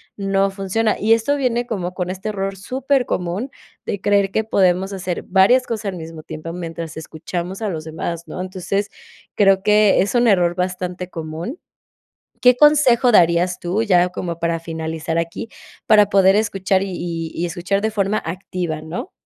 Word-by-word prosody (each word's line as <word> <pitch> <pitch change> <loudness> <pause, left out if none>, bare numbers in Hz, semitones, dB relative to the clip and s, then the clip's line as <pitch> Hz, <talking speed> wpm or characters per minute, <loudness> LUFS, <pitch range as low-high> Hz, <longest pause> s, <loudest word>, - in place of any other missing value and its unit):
no 195 0 +1
funciona. 195 +3 0
Y 220 +2 +4
esto 230 +6 +1
viene 245 -3 0
como 185 -6 -4
con 180 -1 -2
este 190 +3 -5
error 195 -1 -3
supercomun 250 -3 -1 0.4
de 200 - -2
creer 200 -1 +2
que 220 - 0
podemos 190 -2 +1
hacer 180 -2 -4
varias 200 +7 +4
cosas 225 -3 -4
al 185 - -7
mismo 160 -1 -8
tiempo 155 +2 -7
mientras 165 -2 -6
escuchamos 175 +5 -5
a 210 - 0
los 160 -3 -4
demás, 165 +1 -5
¿no? 160 - -7
Entonces, 190 +2 -3 0.4
creo 195 -1 +4
que 210 -1 +4
es 200 - -1
un 240 -1 +3
error 180 -5 +3
bastante 180 0 -3
común, 165 - -6 0.8
¿qué 250 0 +6
consejo 265 -4 +5
darías 175 -1 +3
tú, 190 +6 -1
ya 180 -4 +4
como 170 -2 -5
para 170 -1 -1
finalizar 160 0 -4
aquí, 170 +7 -3 0.4
para 210 -1 +6
poder 195 0 +5
escuchar, 195 -2 +1
y 195 - -5
y 165 -2 -4
y 175 - -1
escuchar 180 +4 -2
de 220 - 0
forma 205 0 0
activa, 170 -2 -4
no? 160 - -6
190 Hz, 170 wpm, -20 LUFS, 170-210 Hz, 0.8 s, qué